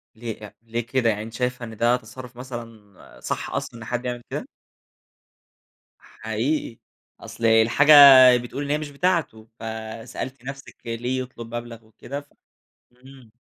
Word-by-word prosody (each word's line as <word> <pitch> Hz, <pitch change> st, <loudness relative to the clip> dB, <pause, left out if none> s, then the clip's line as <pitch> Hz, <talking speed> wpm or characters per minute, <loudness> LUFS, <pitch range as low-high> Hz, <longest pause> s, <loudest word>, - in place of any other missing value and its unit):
ليه 115 Hz, -1 st, -6 dB
لأ، 105 Hz, -1 st, -11 dB
ليه 115 Hz, 0 st, -4 dB
كده 125 Hz, -1 st, +1 dB
يعني 105 Hz, -1 st, -1 dB
أنتِ 115 Hz, +1 st, -10 dB
شايفة 125 Hz, 0 st, -2 dB
إن 110 Hz, -1 st, -10 dB
ده 120 Hz, +2 st, +3 dB
تصرف 125 Hz, +1 st, -10 dB
مثلًا 115 Hz, -6 st, -10 dB
صح، -, -, -4 dB
أصلًا؟ 115 Hz, -, -5 dB
إن 110 Hz, -, -9 dB
حد 125 Hz, +2 st, -3 dB
يعمل 120 Hz, -1 st, -3 dB
كده؟ -, -, -5 dB, 1.5 s
حقيقي، 115 Hz, +3 st, -3 dB, 0.4 s
أصل 115 Hz, -, -6 dB
الحاجة 115 Hz, +7 st, +5 dB, 0.4 s
بتقول 120 Hz, +4 st, -5 dB
إن 140 Hz, -, -5 dB
هي 150 Hz, -, +2 dB
مش 155 Hz, -1 st, -6 dB
بتاعته، 145 Hz, -8 st, -1 dB
فسألتِ 115 Hz, +3 st, -7 dB
نفسِك 140 Hz, +1 st, -8 dB
ليه 120 Hz, +3 st, -2 dB
يطلب 120 Hz, -2 st, -8 dB
مبلغ 115 Hz, -1 st, -7 dB
وكده 135 Hz, +5 st, -8 dB
ف 145 Hz, -, -26 dB, 0.6 s
امم. 125 Hz, -2 st, -17 dB
120 Hz, 145 wpm, -23 LUFS, 115-130 Hz, 1.5 s, الحاجة